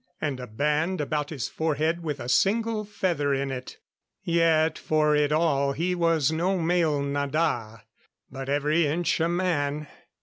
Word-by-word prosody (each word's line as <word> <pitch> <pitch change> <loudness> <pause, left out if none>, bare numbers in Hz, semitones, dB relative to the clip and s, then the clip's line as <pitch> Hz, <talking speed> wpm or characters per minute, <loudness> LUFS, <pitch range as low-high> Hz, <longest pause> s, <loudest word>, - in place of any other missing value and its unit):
And 140 -4 -2
a 125 - -7
band 150 - 0
about 150 0 -2
his 145 -6 -3
forehead 160 +2 -1
with 150 -4 -4
a 120 - -6
single 215 - +1
feather 170 -9 0
in 135 0 -2
it. 130 -1 -7 0.5
Yet, 165 -2 +2
for 150 -1 +2
it 150 0 +2
all, 145 -3 +2
he 170 +6 -1
was 165 -4 +2
no 180 +4 0
male 165 -4 +1
nada, 140 -6 -1 0.5
but 135 0 -6
every 150 +3 +2
inch 170 +4 0
a 165 +1 +1
man. 155 -5 -1
155 Hz, 155 wpm, -26 LUFS, 140-170 Hz, 0.5 s, Yet